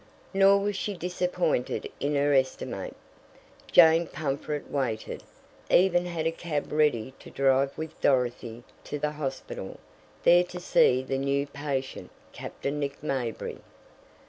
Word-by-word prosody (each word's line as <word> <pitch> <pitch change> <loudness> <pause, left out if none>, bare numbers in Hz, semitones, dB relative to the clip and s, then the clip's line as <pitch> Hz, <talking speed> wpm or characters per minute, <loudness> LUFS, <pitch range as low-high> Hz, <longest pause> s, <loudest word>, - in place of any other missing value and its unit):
Nor 195 +1 +5
was 205 0 -1
she 200 +1 -3
disappointed 180 - -1
in 145 +1 0
her 145 +1 +2
estimate; 130 -1 -1 0.8
Jane 165 0 +7
Pumfret 145 0 -3
waited 125 -6 -3 0.5
even 180 -1 +4
had 165 -2 -3
a 165 - +2
cab 165 -3 -4
ready 145 -5 +1
to - - -12
drive 135 0 +2
with 160 0 -7
Dorothy 120 -3 0 0.2
to 150 - -4
the 150 +1 -1
hospital, 135 -9 -6 0.4
there 175 +1 +6
to 180 0 -8
see 130 -7 +3
the 135 0 -2
new 140 +1 0
patient, 140 -2 -4 0.2
Captain 140 +1 -5
Nick 140 0 -4
Mayberry. 130 -6 -3
145 Hz, 130 wpm, -27 LUFS, 135-170 Hz, 0.8 s, Jane